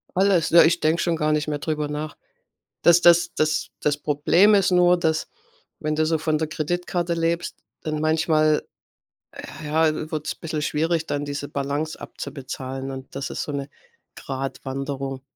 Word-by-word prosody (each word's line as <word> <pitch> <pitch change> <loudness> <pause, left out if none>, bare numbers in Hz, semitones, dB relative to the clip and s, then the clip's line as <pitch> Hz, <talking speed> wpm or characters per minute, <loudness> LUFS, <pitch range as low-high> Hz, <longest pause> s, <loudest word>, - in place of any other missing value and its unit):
Alles. 185 -4 +3
Ja, 170 +1 +8
ich 170 +2 +3
denke 160 +2 +2
schon 170 -2 +1
gar 155 -1 0
nicht 150 0 0
mehr 150 -1 -2
drüber 150 -1 -2
nach. 150 0 -5 0.6
Das 170 0 +6
das 175 0 +5
das 155 0 0
das 145 -1 0
Problem 155 +8 +3
ist 195 -2 +4
nur, 180 0 +5
dass 160 -2 0 0.5
wenn 155 0 -1
du 155 +1 +2
so 160 0 +1
von 155 0 0
der 160 - -1
Kreditkarte 175 +2 -2
lebst, 170 +1 -1 0.2
dann 155 -1 -3
manchmal 155 -1 +2 1.0
ja, 155 0 +1
wird's 155 -1 -3
bissel 155 -2 -4
schwierig, 160 +2 0
dann 145 0 -2
diese 145 0 -5
Balance 145 +3 -3
abzubezahlen. 135 0 -6
Und 130 0 -9
das 135 0 -4
ist - - -3
so 150 - -5
'ne 140 0 -4 0.5
Gradwanderung. 135 0 -5
155 Hz, 160 wpm, -23 LUFS, 145-165 Hz, 1.0 s, Ja